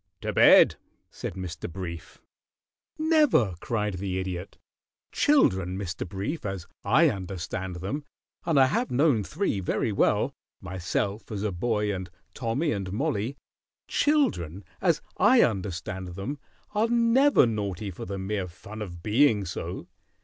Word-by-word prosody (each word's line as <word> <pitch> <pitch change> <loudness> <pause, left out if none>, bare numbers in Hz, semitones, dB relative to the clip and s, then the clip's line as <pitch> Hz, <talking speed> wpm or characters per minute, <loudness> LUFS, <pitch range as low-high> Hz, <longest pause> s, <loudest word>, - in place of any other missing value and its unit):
"To - - -3
bed," - - +7 0.3
said - - -6
Mr. 90 -2 -6
Brief. 85 -2 -7 0.8
"Never!" 305 - +3
cried 105 -4 -2
the 95 -1 -2
Idiot. 95 0 -5 0.5
"Children, 95 - +3
Mr. 90 -3 -4
Brief, 100 - -4
as 95 -4 -4 0.2
I 135 +11 +5
understand 95 -3 -4
them 115 - -4 0.4
and 165 -5 +2
I 135 - +7
have 230 - 0
known 130 -4 +3
three 155 - -1
very 95 +4 -1
well; 100 - +2 0.3
myself 100 +5 -3
as 105 -1 -3
a 105 - 0
boy, 105 +2 0
and 95 -1 -5 0.2
Tommy 135 +6 -1
and 95 -3 -3
Mollie 120 +1 -1 0.5
children, 155 - +1 0.2
as - - +2
I - - +6
understand 95 -1 -2
them, 130 +10 -4 0.3
are 215 +2 +2
never 240 - +4
naughty 105 -3 -3
for 85 - -7
the 100 +1 -4
mere 95 0 -2
fun 100 +5 -10
of 85 -4 -7
being 110 -2 +3
so. 85 0 -5
100 Hz, 135 wpm, -27 LUFS, 95-135 Hz, 0.8 s, bed